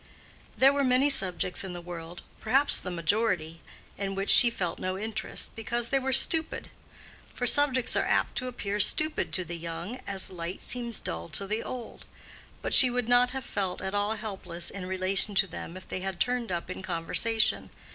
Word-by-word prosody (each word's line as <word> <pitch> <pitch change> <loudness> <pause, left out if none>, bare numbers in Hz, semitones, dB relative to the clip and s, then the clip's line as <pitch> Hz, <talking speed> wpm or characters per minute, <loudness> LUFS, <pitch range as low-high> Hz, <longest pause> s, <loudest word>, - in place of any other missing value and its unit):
There 270 +2 +6
were 280 0 +1
many 260 +2 +4
subjects 185 -5 -1
in 190 -2 -6
the 175 - -6
world—perhaps 175 - -1
the - - -6
majority—in 180 +1 -3
which 195 +1 +1
she 240 - +7
felt 180 -7 -4
no 185 0 -3
interest, 220 +2 -4
because 235 +1 -2
they 270 - +2
were 265 0 -2
stupid; 320 +4 +3 0.7
for 245 - -2
subjects 260 -1 +2
are - - +2
apt - - 0
to 255 - -5
appear 205 -4 -4
stupid 310 +9 +1
to 185 - 0
the 170 +1 -7
young 170 +8 -6
as 195 -2 -3
light 175 +1 -6
seems 240 -2 -4
dull 80 +1 -5
to 200 - +1
the 215 +3 -2
old; 245 -3 -8 0.6
but - - -2
she 255 - +10
would 245 -1 -2
not 245 0 +4
have 265 0 -6
felt 190 -3 -3
at 190 +1 -5
all 205 +2 0
helpless 190 -5 -6
in 185 -2 -7
relation 190 +2 +3
to 195 - +4
them 175 0 -8
if 185 - -13
they - - -5
had 190 -1 -5
turned 245 -4 -1
up 175 +1 -4
in 185 - -6
conversation. 190 +5 +1
200 Hz, 185 wpm, -28 LUFS, 180-245 Hz, 0.7 s, she